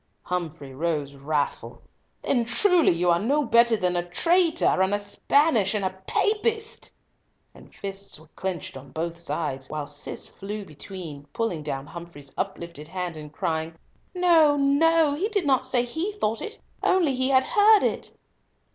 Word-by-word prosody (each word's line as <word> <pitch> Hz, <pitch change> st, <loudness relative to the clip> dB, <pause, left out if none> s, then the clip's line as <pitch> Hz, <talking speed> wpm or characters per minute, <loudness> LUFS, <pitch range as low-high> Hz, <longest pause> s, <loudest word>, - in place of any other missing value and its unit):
Humfrey 160 Hz, -6 st, -4 dB
rose 150 Hz, -1 st, -2 dB
wrathful. 145 Hz, +1 st, -3 dB, 0.4 s
"Then 245 Hz, -3 st, +2 dB
truly 360 Hz, -, +4 dB
you 175 Hz, +1 st, +2 dB
are 170 Hz, -, +3 dB
no 280 Hz, +8 st, +1 dB
better 235 Hz, -1 st, +5 dB
than 180 Hz, -3 st, 0 dB
a 175 Hz, -, +2 dB
traitor, 335 Hz, -, +2 dB, 0.2 s
and 190 Hz, +2 st, +2 dB
a -, -, -1 dB
Spaniard, 215 Hz, +1 st, +2 dB
and 200 Hz, -2 st, 0 dB
a 185 Hz, -, 0 dB, 0.2 s
Papist," 440 Hz, +1 st, 0 dB, 0.6 s
and -, -, -16 dB
fists 195 Hz, -3 st, -7 dB
were 155 Hz, -, -16 dB
clenched 185 Hz, -6 st, -5 dB
on 135 Hz, +1 st, -12 dB
both 170 Hz, +1 st, -4 dB
aides, 135 Hz, -5 st, -3 dB
while 150 Hz, -1 st, -3 dB
Cis 145 Hz, 0 st, -5 dB
flew 205 Hz, +1 st, -7 dB
between, 155 Hz, -3 st, -9 dB
pulling 225 Hz, -9 st, -2 dB
down 140 Hz, -2 st, -4 dB
Humfrey's 165 Hz, -4 st, -10 dB
uplifted 170 Hz, -5 st, -5 dB
hand, 180 Hz, 0 st, -4 dB
and 150 Hz, -1 st, -9 dB
crying, 160 Hz, +2 st, -2 dB, 0.4 s
"No, 330 Hz, -5 st, +5 dB
no; 295 Hz, +2 st, +4 dB
he 345 Hz, +8 st, -1 dB
did 405 Hz, -6 st, 0 dB
not 260 Hz, -2 st, +2 dB
say 250 Hz, -2 st, +2 dB
he 320 Hz, -, -3 dB
thought 225 Hz, -, -1 dB
so, -, -, -4 dB, 0.3 s
only 345 Hz, -7 st, +3 dB
he 260 Hz, +1 st, +1 dB
had 260 Hz, -1 st, +5 dB
heard 420 Hz, +4 st, +5 dB
it." -, -, -2 dB
195 Hz, 160 wpm, -25 LUFS, -, 0.6 s, better